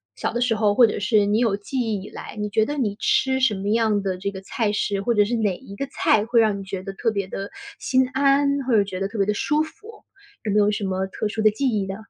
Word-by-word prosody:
小 - - -2
的 240 - -2
时 245 -1 +2
候， 210 -2 +1
或 245 - +7
者 215 - -2
是 210 0 +3
你 205 +2 +1
有 225 -5 +1
记 230 +6 -5
忆 220 -5 -1
以 - - -9
来， - - -9
你 210 0 -3
觉 220 +1 +2
得 295 - -3
你 215 -7 -1
吃 265 0 +2
什 255 -5 +2
么 195 +1 -3
样 215 -2 +2
的 190 -2 -1
这 190 +2 -3
个 190 -1 -8
菜 210 +2 -1
式， 205 -1 -1
或 235 +3 0
者 205 -1 +4
是 235 +4 -1
哪 205 -5 0
一 200 - -12
个 275 +7 -4
菜 220 -5 +2
会 230 +2 +2
让 215 -3 +2
你 - - -7
觉 190 -1 -6
得 195 0 -6
特 225 +4 -1
别 200 -3 -2
地 195 +1 -6 0.3
心 260 -1 +2
安， 280 +1 +2
或 255 - +1
者 205 - +5
觉 190 -2 -6
得 195 - -1
特 205 - -8
别 200 - +2
地 210 - 0
舒 300 +8 +1
服， 425 +7 -13 0.4
有 215 - -2
没 210 - +4
有 205 0 +4
什 210 0 -2
么 190 0 -1
特 195 - -3
殊 220 +1 -3
的 215 - +6
记 240 +6 -1
忆 205 -4 -1
呢？ 195 - -4
210 Hz, 315 characters per minute, -23 LUFS, 200-240 Hz, 0.4 s, 或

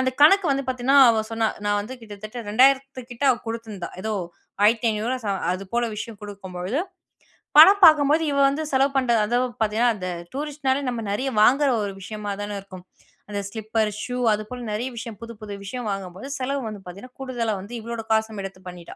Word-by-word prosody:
அந்த 260 0 +1
கணக்கு 375 +4 +7
வந்து 275 0 -2
பாத்தீங்கன்னா, 260 +2 +3
அவ 220 -1 +1
சொன்னா 225 -1 +1 0.2
"நான் 205 0 +2
வந்து 255 +5 -8
கிட்டத்தட்ட 215 +2 -8
2,000த்து 265 +3 +3
கிட்ட 240 - -10
அவ 245 - +1
குடுத்துருந்தா. 220 -6 -6
ஏதோ 220 0 -2 0.5
ரூ.1,500வா 225 +2 +1
ச - - -2 0.2
அது 185 +2 -5
போல 240 0 +2
விஷயம் 220 0 -6
குடுக்கும்பொழுது, 195 - -4 0.8
பணம் 390 +4 +8
பார்க்கும்போது 310 +1 +5
இவ - - -1
வந்து 295 +3 -2
செலவு 270 +1 +3
பண்ணுற 240 -3 +2
அதுவும் 245 0 0
பாத்தீங்கன்னா, 220 +3 +2
அந்த 185 -1 -4 0.3
டூரிஸ்ட்னாலே 280 -2 -1
நம்ம 240 -2 -3
நெறைய 260 +7 -1
வாங்குற 275 +5 +4
ஒரு 200 - -4
விஷயமா 210 +1 -5
தான 205 0 -4
இருக்கும். 185 -2 -12 0.4
அந்த 205 -1 -3
ஸ்லிப்பர், 220 +1 -1
ஷூ, 250 0 -4 0.2
அது 210 0 +1
போல 250 -1 -7
நெறைய 220 +5 -2
விஷயம் 230 -1 -6
புது, 230 0 -8
புது 210 -1 -7
விஷயம் 235 +3 -5
வாங்கும்போது 195 +3 -5
செலவு 275 +2 -2
வந்து 215 -2 -6
பாத்தீங்கன்னா 200 +8 -11
கூடுதலா 240 -4 -2
வந்து 205 +5 -10
இவளோட 230 +1 -5
காசும் 220 -1 +1
எடுத்து 195 -1 -8
பண்ணிட்டா. 175 -1 -10
230 Hz, 180 wpm, -24 LUFS, 205-260 Hz, 0.8 s, பணம்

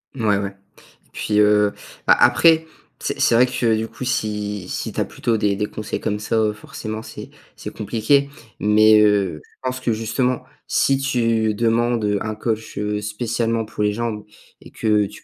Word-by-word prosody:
Ouais, 110 -5 +1
ouais 100 -1 -4 0.5
et - - -36
puis, 105 0 -1
heu, 105 0 +4 0.3
bah - - +6
après, 160 -1 +5 0.3
c'est - - -3
c'est - - +3
vrai 125 +2 +5
que, 115 -3 +1
du 110 +1 -2
coup, 130 - -9
si 105 -6 -2
si - - -4
tu - - -1
as - - 0
plutôt 115 -2 -1
des 105 -1 +1
des 105 +1 -1
conseils 105 0 -5
comme 105 -2 -2
ça, 110 +2 -2
heu, 110 -1 +2
forcément, 110 0 -7
c'est - - -10 0.3
c'est - - -8
compliqué 120 +7 +1 0.3
mais 105 +1 +5
heu, 100 -6 +2
je - - -27
pense 130 0 -2
que, 125 - -1
justement, 115 +3 -1 0.2
si 135 0 +2
tu 115 -5 +1
demandes, 115 0 +1
heu, 105 -1 +1
un 110 -1 -3
coach, 110 0 -3
heu, 105 0 -2
spécialement 115 +1 -1
pour 105 0 -6
les 105 - +2
jambes 110 -1 -3 0.4
et - - -13
que 105 -2 +1
tu - - -14
110 Hz, 190 wpm, -21 LUFS, 105-115 Hz, 0.5 s, bah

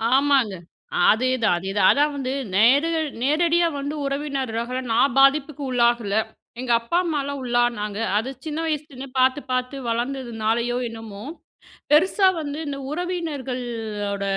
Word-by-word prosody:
ஆமாங்க. 270 -7 +3 0.6
அதேதான் 235 -4 +2
அதேதான் 190 +2 +1
அதான் 295 +1 +2
வந்து 265 -1 -3 0.2
நேர்ல 295 +9 +4 0.2
நேரடியா 335 +4 +3
வந்து 285 +2 -4
உறவினர்களால 265 -4 -2 0.2
நான் 240 +2 +3
பாதிப்புக்கு 280 +1 +3
உள்ளாகல. 235 -4 +2 0.5
எங்க 250 -1 -2
அப்பா 235 +9 -1
அம்மாலாம் 285 -3 -2
உள்ளானாங்க. 240 -4 0 0.2
அது 225 +5 -1 0.2
சின்ன 310 0 -3
வயசுலருந்தே 290 -4 -4
பாத்து 260 +2 +3
பாத்து 255 +2 -1
வளந்ததுனாலயோ, 235 -1 -1
என்னமோ, 220 -3 -9 0.7
பெருசா 375 +5 +5
வந்து 290 0 -5
இந்த 280 -1 -4
உறவினர்களோட 250 - -3
255 Hz, 115 wpm, -23 LUFS, 230-290 Hz, 0.7 s, பெருசா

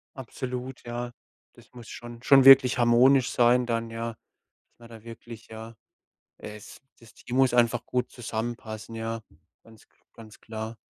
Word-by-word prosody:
Absolut, 130 -1 -7
ja. 120 +1 -5 0.4
Das - - -21
muss 120 -3 -12
schon 120 0 -10
schon 135 -1 +6
wirklich 135 -1 +8
harmonisch 125 +2 +4
sein 125 +1 +3
dann, 115 -1 -3
ja? 115 +1 -5
Dass - - -51
man 115 -1 -15
da 115 -2 -13
wirklich, 115 0 -12
ja 110 +1 -10 0.7
es 105 -1 -11 0.2
das 115 -1 -18
Team 120 - -7
muss 130 -2 +3
einfach 120 -1 +2
gut 125 0 -2
zusammenpassen, 115 -1 -6
ja. 115 0 -4 0.4
Ganz 110 -1 -19 0.3
ganz 110 -2 -15
klar. 110 +1 -7
120 Hz, 150 wpm, -26 LUFS, 115-125 Hz, 0.7 s, wirklich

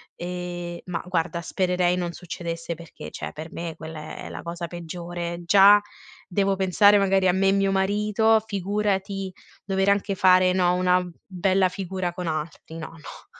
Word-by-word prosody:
Ehm, 175 -1 -5
ma 180 -2 -3
guarda 170 -1 -1
spererei 180 +1 +1
non 175 -1 -2
succedesse 170 -1 -5
perché, 170 -1 -10
cioè - - -6
per 160 +2 -8
me 165 -1 -5
quella 155 -1 -8
è - - -7
la - - -7
cosa 170 0 -5
peggiore, 175 0 -6
già 200 +3 +7 0.5
devo 195 +1 +1
pensare 200 +2 +5
magari 195 -1 +3
a - - +5
me 195 +1 +3
e - - +4
mio 195 0 +2
marito, 210 +3 +2
figurati 195 -1 -2 0.3
dover 195 0 +1
anche 200 0 +1
fare, 185 -1 +5
no, 180 -1 +3
una 180 0 +3 0.2
bella 190 0 +2
figura 185 -1 -4
con 180 -1 -5
altri, 155 +1 -5
no, 165 - -6
no. 160 -3 -12
180 Hz, 160 wpm, -25 LUFS, 170-195 Hz, 0.5 s, già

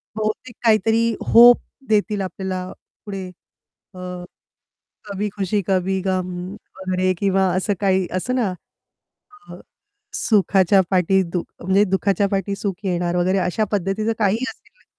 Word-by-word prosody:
बहुतेक 215 +3 -3
काहीतरी 225 +1 +3
होप 240 +1 +8 0.3
देतील 210 -1 +1
आपल्याला 185 0 -4 0.3
पुढे 195 -3 -5 0.7
अ, 185 - -10 1.1
कभी 205 0 -3
खुशी, 200 +1 -1
कभी 190 0 +1
गम 185 -1 -1 0.5
वगैरे 185 0 0
किंवा 195 -1 +2
असं 190 +3 0
काही 190 -2 +2
असंत 245 +8 -1
ना 210 -7 0 1.0
अ, - - -8 0.6
सुखाच्या 195 - +3
पाठी 190 0 +3
दु 175 - -1 0.2
म्हणजे 190 +3 +3
दुःखाच्या 200 0 +1
पाठी 195 0 -1
सुख 195 -2 -3
येणार 175 -2 -1
वगैरे 185 +2 +2
अशा 185 +4 0
पद्धतीचं 205 +3 0
काहीही 220 +3 +1
असेल - - -20
195 Hz, 125 wpm, -21 LUFS, 185-210 Hz, 1.1 s, होप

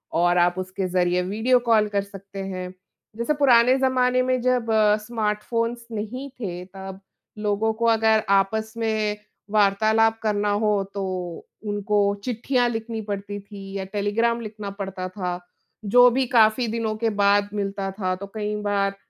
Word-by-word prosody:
और 175 +1 +3
आप 175 +1 +3
उसके 185 +1 -3
ज़रिए 180 0 +1
वीडियो 220 +7 +2
कॉल 225 -3 +3
कर 200 -1 0
सकते 195 0 -11
हैं। 185 -1 -5 0.4
जैसे 235 +6 0
पुराने 255 -1 +5
ज़माने 255 -1 +2
में 255 0 +1
जब 250 -2 +1 0.4
स्मार्टफ़ोन्स 230 +1 -2
नहीं 235 +6 -5
थे 180 -5 -5
तब 190 0 -9 0.4
लोगों 210 +1 0
को 235 - +1
अगर 220 -1 +3
आपस 220 +3 +1
में 215 -2 0 0.3
वार्तालाप 220 +2 +3
करना 210 -1 +1
हो 210 - +3 0.2
तो 200 -1 -3 0.6
उनको 205 0 -1 0.3
चिट्ठियाँ 245 +1 +1
लिखनी 225 -1 -4
पड़ती 205 0 -4
थी 200 -1 -10
या 190 - -4
टेलीग्राम 230 +3 +1
लिखना 210 -2 -6
पड़ता 190 -1 -4
था। 180 -2 -3 0.6
जो 245 0 +9
भी 260 +2 +1
काफ़ी 230 +1 +4
दिनों 220 -1 -2
के 225 0 0
बाद 200 0 +4
मिलता 200 -1 -2
था 185 -1 0
तो 200 +2 -8
कई 210 0 -2
बार 200 -1 0
210 Hz, 150 wpm, -24 LUFS, 195-230 Hz, 0.6 s, जो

